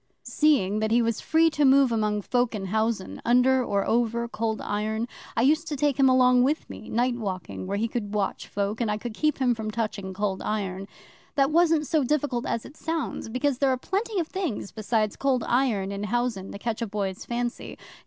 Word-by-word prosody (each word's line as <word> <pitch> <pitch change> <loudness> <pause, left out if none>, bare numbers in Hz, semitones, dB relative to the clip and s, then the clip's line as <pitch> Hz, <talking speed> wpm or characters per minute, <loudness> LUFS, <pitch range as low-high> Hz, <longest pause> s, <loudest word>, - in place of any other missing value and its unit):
'Seeing 250 -10 +2
that 220 0 0
he 230 +2 +4
was 230 -1 0
free 325 +1 +3
to 300 -1 +1
move 270 -1 +5
among 210 -2 0
folk 245 0 0
in 195 -2 -4
housen, 220 -3 -1
under 250 +2 +4
or 200 -4 0
over 235 0 +1
Cold 220 -2 -2
Iron, 215 +2 -2 0.3
I 230 - +3
used 310 +4 +3
to 305 - -2
take 285 0 0
him 265 -1 +6
along 255 -1 +5
with 290 +5 +1
me, - - -10
night 245 +2 +1
walking, 190 -5 -5
where 200 +1 -1
he 225 +3 0
could 215 -3 -4
watch 200 -2 -2
folk, 205 +3 -2
and 230 - 0
I 210 - 0
could 230 +1 -6
keep 305 +5 0
him 255 -2 +2
from 220 -2 -4
touching 210 -3 -3
Cold 195 0 -2
Iron. 195 -2 -3 0.5
That 275 0 +3
wasn't 325 -2 +3
so 305 0 +1
difficult 270 -3 0
as 230 - -2
it - - -12
sounds, 325 -7 -3
because 255 +2 0
there 275 - +3
are 260 - +1
plenty 400 - -2
of 335 - 0
things 340 - -3
besides 215 0 -1
Cold 265 -3 +1
Iron 235 -6 +1
in 200 +1 -3
housen 235 -3 -2
to - - -7
catch 230 +2 -3
a 230 - -1
boy's 195 -2 -3
fancy. 240 0 -4
235 Hz, 210 wpm, -26 LUFS, 210-270 Hz, 0.5 s, him